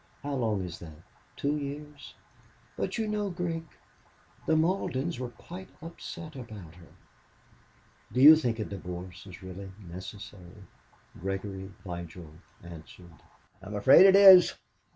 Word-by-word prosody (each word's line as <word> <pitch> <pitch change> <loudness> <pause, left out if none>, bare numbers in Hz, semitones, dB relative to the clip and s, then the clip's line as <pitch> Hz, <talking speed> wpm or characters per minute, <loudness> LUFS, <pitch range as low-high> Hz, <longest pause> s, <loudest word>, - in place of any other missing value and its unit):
How 145 0 -3
long 110 -7 -1
is 85 -2 -8
that? 80 -1 -12 0.3
Two 145 +2 -1
years? 145 0 -8 0.6
But - - -3
you 220 -1 -1
know, 210 -1 -2
Grig, 170 -2 -4 0.8
the 160 - +3
Maldens 160 -3 0
were 125 -1 -4
quite 180 +9 -11
upset 165 -1 -9
about 105 -10 -10
her. 85 -1 -16 1.2
Do 125 - -2
you 150 +4 +10
think 125 -7 -1
a 110 - -3
divorce 90 0 -8
is 95 0 -12
really 95 +1 -8
necessary?" 95 0 -11 0.6
Gregory 95 +1 -5 0.2
Vigil 85 -2 -8 0.3
answered: 85 +1 -12 0.5
"I'm 100 +2 -8
afraid 130 - +7
it 195 - +6
is." 190 -3 +9
110 Hz, 130 wpm, -28 LUFS, -, 1.2 s, you